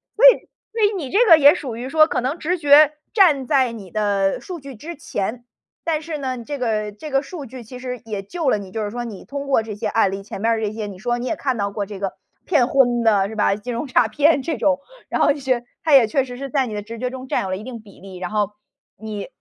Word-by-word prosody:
所 485 - +5
以 - - +7 0.2
所 450 0 -3
以 415 0 +3
你 280 -7 -5
这 410 - +3
个 330 -4 +9
也 285 -1 +7
属 270 -10 -5
于 245 +2 -5
说 310 +2 +5
可 - - -1
能 275 +7 -2
直 360 +4 -1
觉 295 0 +6 0.2
站 325 - +4
在 260 -4 +2
你 200 -5 -10
的 200 -2 +1
数 360 -3 -7
据 275 -1 -10
之 325 +10 -8
前， 230 -2 -4 0.4
但 315 -2 -1
是 315 -1 -5
呢， 260 -3 -4
这 290 +3 -5
个 215 -4 -1
这 290 +8 -9
个 270 0 +2
数 295 -1 -8
据 255 0 -10
其 250 +3 -10
实 250 -1 -6
也 205 -3 -4
救 315 - -2
了 210 - +3
你， 195 -2 -9
就 220 0 -3
是 205 - -3
说 240 +3 -4
你 220 -5 -8
通 280 0 -5
过 270 -5 +2
这 215 -2 -7
些 210 - -3
案 220 -4 +2
例， 195 0 -5
前 195 - -8
边 230 +1 +2
儿 225 - -1
这 210 -1 -1
些 215 -2 -4
你 195 -2 -9
说 240 +4 -1
你 250 - -4
也 325 - -1
看 260 -5 -2
到 200 0 -1
过 200 0 -3
这 200 -1 -8
个 195 -2 -3 0.3
骗 285 -9 +3
婚 245 -3 +3
的 205 -4 +3
是 220 - -8
吧， 200 -1 +2
金 240 +4 -6
融 235 +6 -3
诈 250 -3 +3
骗 295 +5 +3
这 320 +4 -3
种。 280 -2 +2 0.3
然 - - -1
后 285 - +4
是 255 -4 -1 0.2
它 315 -3 +2
也 250 -5 +7
确 265 +4 +1
实 245 -1 -8
是 275 0 -6
在 270 -1 +1
你 220 - -6
的 205 - -3
直 230 +3 -9
觉 250 +2 -2
中 260 0 -8
占 - - 0
有 190 - -4
了 185 - -1
一 210 - -9
定 235 -2 -8
比 200 -3 -17
例， 190 -1 -10
然 180 +2 -5
后 210 -1 0 0.5
你 215 -2 -6
245 Hz, 300 characters per minute, -21 LUFS, 215-285 Hz, 0.5 s, 个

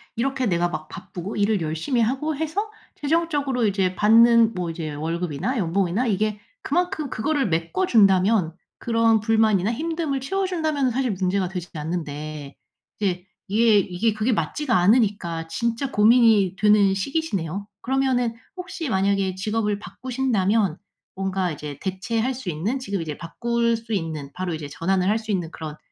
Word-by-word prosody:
이렇게 260 +1 0
내가 175 -2 +1
막 155 -2 -5
바쁘고 190 +1 -7
일을 205 -1 +1
열심히 160 - -1
하고 270 +7 0
해서 340 +9 -2 0.2
최종적으로 290 -6 0
이제 190 -2 +1
받는 230 +2 +5
뭐 175 -2 -2
이제 155 -2 -5
월급이나 165 - -2
연봉이나 190 +6 0
이게 210 0 0 0.2
그만큼 345 -6 -1
그거를 280 +3 0
메꿔 170 - 0
준다면 195 - +4 0.2
그런 230 -1 +3
불만이나 220 -2 +2
힘듦을 315 0 -2
채워 385 +8 -1
준다면은 310 -7 0
사실 250 0 0
문제가 185 0 0
되진 180 -1 -6
않는데 150 -2 -5 0.4
이게 185 -2 -1 0.2
예 220 0 +5
이게 200 +3 +1
그게 215 +4 0
맞지가 230 - -1
않으니까 185 -5 +2
진짜 235 +9 -2
고민이 215 -3 +5
되는 210 -2 +4
시기시네요. 200 - -2
그러면은 255 -2 +1 0.2
혹시 360 -4 -5
만약에 195 -2 +1
직업을 210 +1 -1
바꾸신다면 220 -7 0 0.4
뭔가 190 -1 -1
이제 145 -1 -7
대체할 220 +6 -1
수 250 -7 -6
있는 195 - -2
지금 200 -7 -3
이제 155 -3 -4
바꿀 235 +6 -1
수 225 -1 -7
있는 160 -6 -3
바로 180 -2 -3
이제 155 -2 -6
전환을 185 +5 0
할 215 +3 +2
수 220 -1 -13
있는 175 -5 -2
그런 155 -1 -7
210 Hz, 350 characters per minute, -23 LUFS, 180-245 Hz, 0.4 s, 받는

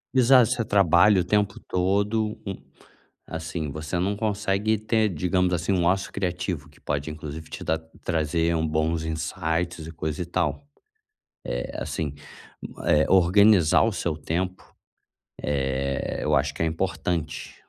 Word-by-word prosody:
Exato, 125 -2 +6
você 120 -2 0
trabalha 100 -1 +5
o - - -1
tempo 105 +2 0
todo 100 +3 0
um 95 -2 -3 0.7
assim, 80 -2 -4
você 75 +4 -4
não 100 +3 0
consegue 105 0 0
ter, 110 0 +1
digamos 90 +2 +1
assim, 90 +2 0
um 90 -2 +1
ócio 95 +2 +1
criativo 90 -5 -3
que - - -22
pode 70 +1 -3
inclusive 75 0 -7
te - - -7
dar 80 0 0 0.2
trazer 80 0 0
um 80 0 0
bons 80 +1 0
insights 80 +1 -2
e - - -7
coisa 80 -1 -4
e - - -2
tal. 90 +11 -2 0.9
Eh, - - -3
assim, 75 -3 -3 0.7
eh, 75 +1 +4
organizar 95 -1 +5
o 110 -2 +1
seu 85 -3 -2
tempo, 90 +4 -4 0.7
eh, 70 -1 -1
eu 75 0 +2
acho 70 0 +1
que 75 - -6
é - - +2
importante. 85 -1 -3
85 Hz, 145 wpm, -25 LUFS, 80-100 Hz, 0.9 s, Exato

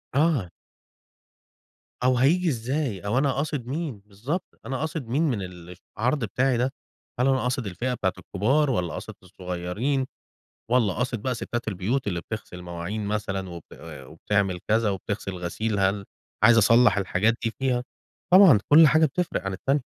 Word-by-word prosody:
آه. 145 - +2 1.5
أو 130 -1 +3
هييجي 170 +7 +3
إزاي؟ 130 -3 -2
أو 105 +5 0
أنا 140 0 +2
قاصد 140 -3 -2
مين؟ 145 -5 -4
بالضبط، 125 - -5
أنا 135 - -3
قاصد 155 -4 -4
مين 140 +8 +1
من 125 -10 0 0.6
العرض 125 +4 0
بتاعي 125 +4 +1
ده؟ 130 +3 0 0.5
هل 125 - +3
أنا 135 -1 +3
قاصد 125 -1 -1
الفئة 120 +7 -2
بتاعة 95 -6 -1
الكبار، 135 +10 +1
والّا 90 -9 -1
قاصد - - -7
الصغيّرين، 90 +9 -3 0.7
والّا 115 -6 +3
قاصد 125 0 -2
بقى 130 +2 -1
ستات 120 0 -4
البيوت 105 +6 -1
اللي 90 -4 -2
بتغسل 110 -3 -7
المواعين 90 +4 -5
مثلًا 95 -2 -3
وب 85 -2 -9 0.4
وبتعمل 95 +3 -1
كذا 110 0 +2
وبتغسل 100 0 -4
الغسيل، 95 +4 -3
هل 100 +1 +1 0.4
عايز 115 +1 +7
أصلَّح 115 -1 +5
الحاجات 100 +3 +2
دي 115 - 0
فيها؟ 125 -2 0 0.5
طبعًا 185 - +8
كل 155 +1 +8
حاجة 155 +2 +5
بتفرق 170 - -2
عن 95 - -2
التانية. 135 +9 0
115 Hz, 155 wpm, -25 LUFS, 100-135 Hz, 1.5 s, طبعًا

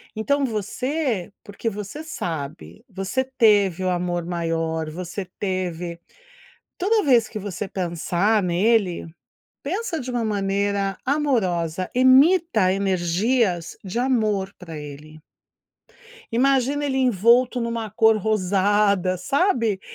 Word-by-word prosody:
Então 280 +6 +1
você, 230 - -2
porque 205 +3 -4
você 210 +8 -7
sabe, 165 - -6
você 195 +7 -2
teve 205 -8 +3
o 185 - +1
amor 175 -1 -1
maior, 165 -2 -2
você 180 +4 -6
teve 180 -3 -3 0.8
toda 420 +3 +2
vez 245 -7 +4
que 215 - -6
você 200 0 -5
pensar 180 +3 0
nele, 185 0 +1 0.6
pensa 360 +3 -3
de 255 0 -5
uma 240 -1 -1
maneira 200 -1 -1
amorosa, 185 - 0
emita 260 - +5
energias 190 +1 0
de 190 +3 -5
amor 215 -6 0
para 165 -4 -9
ele. 150 +1 -10 1.1
Imagina 270 +3 +2
ele 270 -2 -1
envolto 245 +1 +3
em 235 - -1
uma 230 -2 -4
cor 220 +1 +4
rosada, 200 -2 +1
sabe, 230 - +1
205 Hz, 110 wpm, -23 LUFS, 180-250 Hz, 1.1 s, emita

